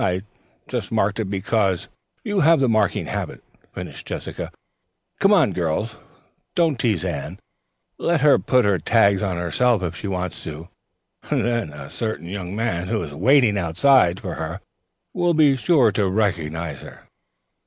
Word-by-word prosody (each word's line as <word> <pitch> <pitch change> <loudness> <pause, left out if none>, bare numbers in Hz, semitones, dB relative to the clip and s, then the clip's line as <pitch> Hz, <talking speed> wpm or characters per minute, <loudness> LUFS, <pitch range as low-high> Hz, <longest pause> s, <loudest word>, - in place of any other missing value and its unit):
"I 95 0 0 0.4
just - - -4
marked 105 -1 +1
it 105 -4 -2
because 100 -1 0 0.2
" - - -47
"You 205 -1 -1
have 165 -1 +5
the 135 - +3
marking 110 -3 +1
habit," - - -5 0.3
finished - - -8
Jessica. - - -5 0.7
"Come 195 - +4
on, 160 - +4
girls. 90 +6 -2 0.6
Don't 160 -7 +2
tease 105 -8 0
Anne. 75 -6 -4 0.6
Let 170 -3 +1
her 145 -1 +5
put 100 - +2
tags 100 -3 +3
on 95 -4 -1
herself 95 +6 +1
if 85 -1 -3
she 100 - -6
wants 90 -2 -4
to. 80 +2 -8 0.6
Then 115 -8 0
a 75 -2 -9
certain 110 -3 -4
young 95 -1 -5
man 95 -6 -2
who 110 -3 -1
is 75 -3 -7
waiting 110 - +4
outside 90 +2 +3
for 90 -4 -5
her 80 +3 -5 0.5
will 175 -2 +1
be 150 -3 +5
sure 135 -4 +3
to 100 -1 0
recognize 85 -7 -2
her. - - -12
100 Hz, 155 wpm, -22 LUFS, 90-125 Hz, 0.7 s, have